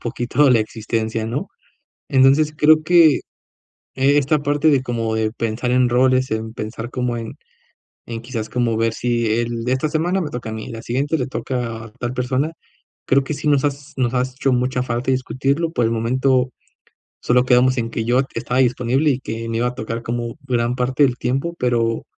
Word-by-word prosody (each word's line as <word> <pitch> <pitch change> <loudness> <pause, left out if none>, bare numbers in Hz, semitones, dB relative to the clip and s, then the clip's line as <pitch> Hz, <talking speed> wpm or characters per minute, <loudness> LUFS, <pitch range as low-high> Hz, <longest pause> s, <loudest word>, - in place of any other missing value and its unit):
poquito 120 +4 +1
la 120 - +5
existencia, 110 0 -3
¿no?, 115 - -3 0.6
entonces 135 +3 +4
creo 155 +1 +5
que 165 -2 +5 0.7
esta 140 +2 +2
parte 145 +2 +2
de 140 -3 +3
como 115 -3 -2
de 110 -1 0
pensar 115 +1 -2
en 125 0 +3
roles, 130 +1 +2
en 110 0 -3
pensar 115 +2 -6
como 125 -2 -2
en 115 -1 -6 0.7
en 115 -1 -5
quizás, 115 -3 -5
como 120 -3 0
ver 115 0 +1
si 120 -2 0
el 120 -1 -2
de 125 - -1
esta 140 +4 0
semana 175 +4 0
me 155 - -3
toca 120 -2 -6
a - - -4
mí 110 - -6
y - - -9
la 115 -1 -7
siguiente 140 +6 -1
le 125 - -1
toca 115 -2 -4
a 110 - -13
tal 120 +1 -3
persona, 130 +5 -1 0.5
creo 135 +1 +3
que 145 - -4
sí 150 - -4
nos 145 -1 +3
has 145 +1 -4
nos 125 -1 0
ha 125 - +3
hecho 130 +1 -1
mucha 125 0 0
falta 125 +1 -1
discutirlo, 135 +5 -1
por 120 -7 +1
el 115 - +1
momento 125 +2 +1 0.7
solo 125 0 +3
quedamos 130 0 +3
en 115 0 -2
que 115 - -3
yo 120 +2 +3
estaba 125 +1 0
disponible 125 +4 +2
y 130 -2 0
que 115 -2 -5
me 115 0 -2
iba 120 +1 +1
a 125 - -6
tocar 115 +1 -5
como 120 0 -4
gran 120 -2 0
parte 130 +3 +1
del 125 -2 0
tiempo, 135 +7 -1
pero 115 -2 0
125 Hz, 195 wpm, -20 LUFS, 115-135 Hz, 0.7 s, la